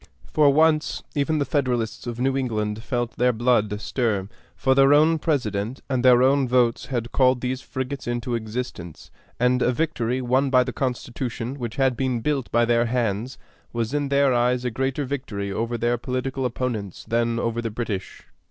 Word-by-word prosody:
For 150 -2 +3
once, 155 +1 +2
even 150 +1 0
the 145 - +1
Federalists 125 -5 -1
of 120 0 -5
New 135 +1 +1
England 110 -5 -2
felt 120 -1 -3
their 125 +1 +3
blood 110 -3 +1
stir; 105 -4 -1 0.3
for 130 - +2
their 135 +1 +6
own 160 +2 +4
President 120 - -1
and 125 -2 0
their 125 -1 +6
own 135 0 +3
votes 120 -2 +2
had 120 -2 -3
called 130 -1 +3
these 130 +1 -2
frigates 130 +1 -5
into 120 0 -2
existence, 110 -7 -5 0.3
and 125 +1 +2
a 125 - +3
victory 130 -4 -1
won 130 +2 +1
by 130 -1 +5
the 125 0 -5
Constitution, 125 -1 -3
which 120 -2 -4
had 135 -2 +2
been 130 -2 -1
built 140 -1 -1
by 120 +1 +3
their 120 0 +2
hands, 115 0 -1 0.4
was 115 +1 -2
in 145 -1 0
their 140 -1 +3
eyes 125 +1 +1
a 125 - 0
greater 135 +4 -1
victory 115 -8 -4
over 115 +4 -2
their 120 +1 0
political 130 +1 -3
opponents 115 -6 -3
than 115 0 +1
over 115 0 -1
the 115 - -3
British. 110 -3 -5
125 Hz, 180 wpm, -24 LUFS, 115-135 Hz, 0.4 s, their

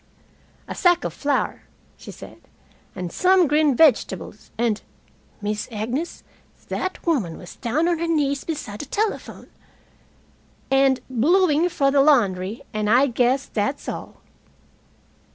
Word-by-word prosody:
"A - - -5
sack 355 -1 +3
of - - -3
flour," 285 -1 -1 0.3
she - - -13
said, - - -11 0.5
"and 180 -2 -5
some 370 -1 +4
green 300 -2 +3
vegetables, 230 - +2
and 225 -2 0 0.6
Miss 210 0 -2
Agnes, 240 +10 -4 0.5
that 370 0 -4
woman 235 - 0
was 180 - -12
down 280 +8 0
on 345 -2 +1
her 335 - -1
knees 285 -4 0
beside 280 -10 -5
the 295 - -6
telephone! 425 +8 -3 1.2
and 270 -1 +3
bluing 320 +6 +3
for 275 -5 +1
the 275 0 +4
laundry, 210 -8 +2
and 215 -1 -1
I 250 +5 +5
guess 255 +1 +1
that's 215 +7 -3
all." - - -6
275 Hz, 130 wpm, -23 LUFS, 220-320 Hz, 1.2 s, I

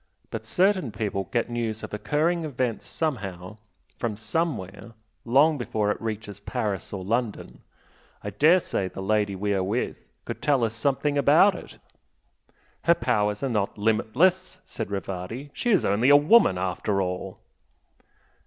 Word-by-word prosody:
But 110 -1 -5
certain 185 - +1
people 105 -2 -3
get 120 - 0
news 115 -2 -3
of - - -7
occurring 155 +10 0
events 125 -6 -3
somehow, 100 - -4 0.4
from 115 -4 -2
somewhere, 115 - -3 0.3
long 140 +5 +4
before 105 -3 0
it - - -5
reaches 110 -3 -5
Paris 100 -1 -3
or 95 -2 -5
London. 115 +1 -3 0.6
I 105 - -4
dare 155 - +5
say 100 - -2
the 95 - -9
lady 105 0 +1
we 100 +2 -1
are 95 - +1
with 105 +7 -3 0.2
could - - -6
tell 140 -4 +2
us 115 -1 0
something 140 +4 0
about 160 +8 +5
it." - - -10 1.1
"Her 170 - +6
powers 105 -8 0
are - - +1
not 105 -4 -1
limitless!" 150 - +1
said 110 - -5
Rivardi 100 +7 -5
"She 240 - -2
is 200 -6 +3
only 110 +7 +3
a 145 - +9
woman 145 - +5
after 95 +2 -1
all!" 90 -1 -3
110 Hz, 150 wpm, -25 LUFS, 100-145 Hz, 1.1 s, a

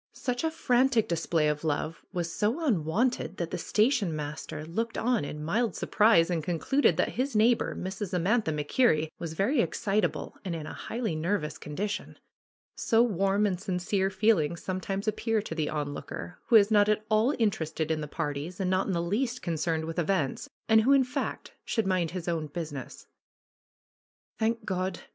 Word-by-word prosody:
Such 245 +1 -3
a 320 - +2
frantic 255 -6 +2
display 165 -2 +1
of 150 0 -1
love 155 +1 -2
was 175 -3 -3
so 235 +11 0
unwonted 195 - 0
that 170 -1 -3
the - - -2
station 215 - +2
master 150 0 -5
looked 225 +8 -3
on 240 -4 +1
in 150 +1 -5
mild 220 +8 0
surprise 205 -6 +4
and 165 -3 -1
concluded 180 - +2
that - - +2
his 260 +1 -2
neighbor, 225 +3 +3
Mrs. 190 +1 -4
Amantha 185 +2 +1
MacKerrie, 155 - +2
was 165 -2 -4
very 235 - +2
excitable 205 -5 -1
and 180 -4 -3
in 155 -2 -5
a - - -7
highly 225 -8 -3
nervous 160 -1 -2
condition. 200 +8 -4 0.6
So 230 0 +3
warm 200 -2 +2
and 185 -3 -1
sincere 190 0 0
feelings 190 -5 +1
some 185 0 -3
times 195 +2 -3
appear 225 +1 +1
to 190 - -5
the 155 -2 -1
onlooker, 150 +3 -5
who 235 - +4
is 210 0 +7
not 205 -1 +5
at 215 0 +1
all 215 +3 +3
inter 215 - +1
ested 160 0 -3
in 155 -1 0
the 150 - -4
parties 150 +2 -4
and 185 -1 0
not 185 +1 +1
in 195 - 0
the 170 -1 0
least 235 +7 -1
concerned 160 -1 -1
with 165 +2 -3
events, 170 -5 -1 0.2
and 220 0 +6
who, 265 +5 +4
in 275 -1 +5
fact, 265 +3 -4
should 225 -3 -1
mind 185 -3 +1
his 180 -1 -6
own 165 -3 -1
business. 145 -4 -6 1.4
^^Thank 225 0 0
God 185 -1 -2
190 Hz, 180 wpm, -28 LUFS, 160-225 Hz, 1.4 s, is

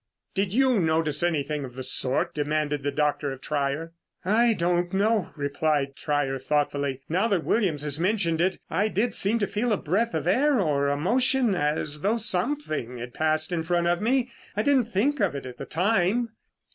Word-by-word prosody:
"Did 195 -1 0
you 255 0 +3
notice 160 -3 0
anything 150 -3 -1
of 125 -2 -8
the 130 - -5
sort?" 130 +1 0
demanded 150 -1 -1
the 145 - -1
doctor 145 -1 0
of 135 - -7
Trier. 150 +3 -2 0.3
"I 230 +4 +4
don't 175 -1 0
know," 210 0 +1
replied 145 -1 -1
Trier 145 -2 -1
thoughtfully. 140 -1 -1
"Now 185 +7 +1
that 195 -7 0
Williams 175 -10 +1
has 150 0 -2
mentioned 175 -3 +1
it, 185 +2 +1
I 205 +3 +1
did 215 +2 0
seem 205 +4 +2
to 210 - +1
feel 215 +4 -1
a 210 - +2
breath 215 +10 0
of - - -2
air 285 -1 +3
or 145 -6 +1
a 140 0 0
motion 245 - +2
as 150 -2 -1
though 210 +6 +1
something 185 - -1
had 120 +1 -7
passed 155 +1 0
in 170 -2 0
front 170 +1 0
of 175 +2 +1
me. 250 +2 +1 0.3
I 210 - +2
didn't 270 -3 +3
think 240 +7 0
of 190 -7 +1
it 140 - -5
at 125 -1 -8
the 135 - -5
time." 205 +5 +1
170 Hz, 190 wpm, -26 LUFS, 145-215 Hz, 0.3 s, I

